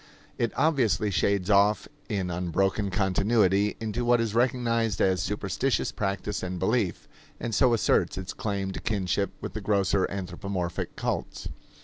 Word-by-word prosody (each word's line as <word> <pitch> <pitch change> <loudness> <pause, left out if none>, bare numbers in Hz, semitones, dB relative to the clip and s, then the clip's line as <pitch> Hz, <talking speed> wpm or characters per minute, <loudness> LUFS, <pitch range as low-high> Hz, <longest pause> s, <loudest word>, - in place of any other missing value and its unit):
It 115 - +1
obviously 130 -8 +2
shades 100 +1 +1
off 100 +1 +4 0.2
in 95 -3 -1
unbroken 95 +4 0
continuity 100 +1 +2
into 115 +1 -2
what 120 0 +4
is 115 -2 -1
recognized 115 -3 +1
as 95 -1 +2
superstitious 105 +5 -1
practice 100 0 -2
and 90 0 -4
belief, 95 -1 0 0.3
and 115 - -4
so 125 +4 +4
asserts 115 - +2
its 95 -1 -5
claim 100 -2 -2
to - - -5
kinship 100 -2 0
with - - -5
the 110 - -4
grosser 100 -1 +1
anthropomorphic 90 -1 -4
cults. - - -3
100 Hz, 140 wpm, -27 LUFS, 95-115 Hz, 0.3 s, off